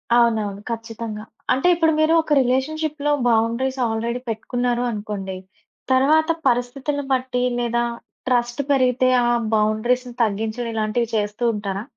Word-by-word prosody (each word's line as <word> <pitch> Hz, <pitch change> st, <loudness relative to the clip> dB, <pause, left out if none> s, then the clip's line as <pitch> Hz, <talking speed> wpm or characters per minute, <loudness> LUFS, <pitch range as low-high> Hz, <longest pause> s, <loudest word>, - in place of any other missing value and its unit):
అవునవును. 220 Hz, -4 st, +2 dB
ఖచ్చితంగా. 225 Hz, -2 st, -5 dB, 0.3 s
అంటే 265 Hz, +7 st, +1 dB
ఇప్పుడు 325 Hz, -1 st, +3 dB
మీరు 310 Hz, +1 st, +4 dB
ఒక 310 Hz, -1 st, -1 dB
రిలేషన్‌షిప్‌లో 295 Hz, +3 st, -1 dB, 0.2 s
బౌండరీస్ 235 Hz, +4 st, +1 dB
ఆల్రెడీ 230 Hz, +2 st, -2 dB
పెట్టుకున్నారు 245 Hz, +2 st, -1 dB
అనుకోండి, 205 Hz, -3 st, -5 dB, 0.5 s
తర్వాత 305 Hz, +5 st, +4 dB, 0.2 s
పరిస్థితులను 270 Hz, +4 st, -1 dB
బట్టి 255 Hz, -1 st, -1 dB, 0.2 s
లేదా 240 Hz, 0 st, 0 dB, 0.5 s
ట్రస్ట్ 240 Hz, +2 st, +1 dB
పెరిగితే 255 Hz, -1 st, +3 dB, 0.2 s
ఆ -, -, +2 dB, 0.3 s
బౌండరీస్‌ని 240 Hz, +4 st, +1 dB
తగ్గించడం 220 Hz, +3 st, -2 dB
ఇలాంటివి 220 Hz, +2 st, 0 dB
చేస్తూ 210 Hz, +2 st, -2 dB
ఉంటారా? 200 Hz, -1 st, -4 dB
240 Hz, 115 wpm, -22 LUFS, 220-260 Hz, 0.5 s, మీరు